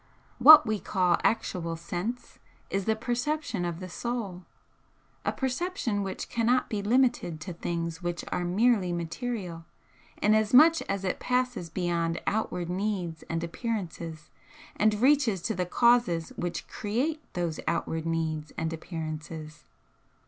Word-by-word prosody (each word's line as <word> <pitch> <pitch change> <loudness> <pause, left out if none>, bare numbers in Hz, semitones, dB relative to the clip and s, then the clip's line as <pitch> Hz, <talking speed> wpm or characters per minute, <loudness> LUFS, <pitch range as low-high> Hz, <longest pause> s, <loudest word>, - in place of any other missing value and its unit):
What 300 +5 +10
we 215 -1 -1
call 180 -4 +1
actual 170 -7 0
'Sense' 180 +9 -5 0.3
is 195 -1 -1
the 220 - +2
perception 245 - -2
of 170 -1 -3
the 185 - -6
Soul, 200 -3 -4 0.8
a - - +1
perception 265 - -2
which 195 -1 -4
cannot 240 +2 +1
be 210 -2 -1
limited 235 -7 +2
to 175 +3 -5
things 170 0 -3
which 175 -1 -3
are 180 - -1
merely 195 +1 +2
material, 175 0 -4 0.6
inasmuch 230 +10 +5
as 195 -1 -1
it 185 - -1
passes 250 -8 -1
beyond 170 -1 -1
outward 180 -5 -1
needs 180 -3 -2
and 165 0 -2
appearances 170 -5 -5 0.4
and 215 0 +3
reaches 255 -3 +3
to - - 0
the 180 -1 -2
causes 235 -6 +3
which 175 -1 -4
create 260 +10 -2
those 170 -3 -2
outward 165 -1 -1
needs 160 -2 -2
and 160 0 -2
appearances. 155 -2 -6
185 Hz, 130 wpm, -28 LUFS, 170-235 Hz, 0.8 s, What